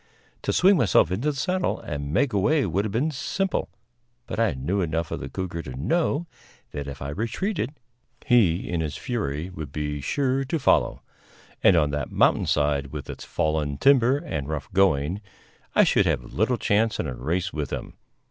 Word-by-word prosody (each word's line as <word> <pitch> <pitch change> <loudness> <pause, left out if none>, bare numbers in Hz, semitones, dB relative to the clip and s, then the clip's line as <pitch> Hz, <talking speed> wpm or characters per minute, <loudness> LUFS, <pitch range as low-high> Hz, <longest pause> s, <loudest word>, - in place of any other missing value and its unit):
To - - -1
swing 190 +1 +5
myself 95 - +4
into 115 +11 0
the 145 - -3
saddle 185 +6 0
and 70 -2 -5
make 125 - +2
away 135 +9 +2
would 95 +4 0
have 105 - -3
been 135 +10 0
simple, 190 +6 -2 0.6
but - - -5
I 115 -2 +3
knew 85 +10 -1
enough 80 -1 -2
of - - -3
the - - -6
cougar 90 -3 -4
to 65 -5 -8
know 160 - +1 0.5
that 70 -1 -5
if 70 0 -7
I 70 - -4
retreated, 140 - -2 0.5
he, 100 -8 +3
in 85 -2 -1
his 75 -2 -3
fury, 95 - -3
would 80 -6 -7
be 75 -1 -3
sure 135 - 0
to 140 +5 -1
follow; 150 - +2 0.6
and 95 - +7
on 75 -3 +3
that 75 -2 -3
mountain - - +3
side, 70 -1 +1
with - - -6
its - - -9
fallen 75 -2 -1
timber 130 - +5
and 80 - -4
rough 75 -1 -5
going, 90 -1 +2 0.5
I - - +7
should - - +3
have - - -2
little 115 +5 +1
chance 110 +1 +1
in - - -1
a 70 - -3
race 85 +10 -2
with 75 -3 -3
him. - - -5
90 Hz, 185 wpm, -25 LUFS, -, 0.6 s, and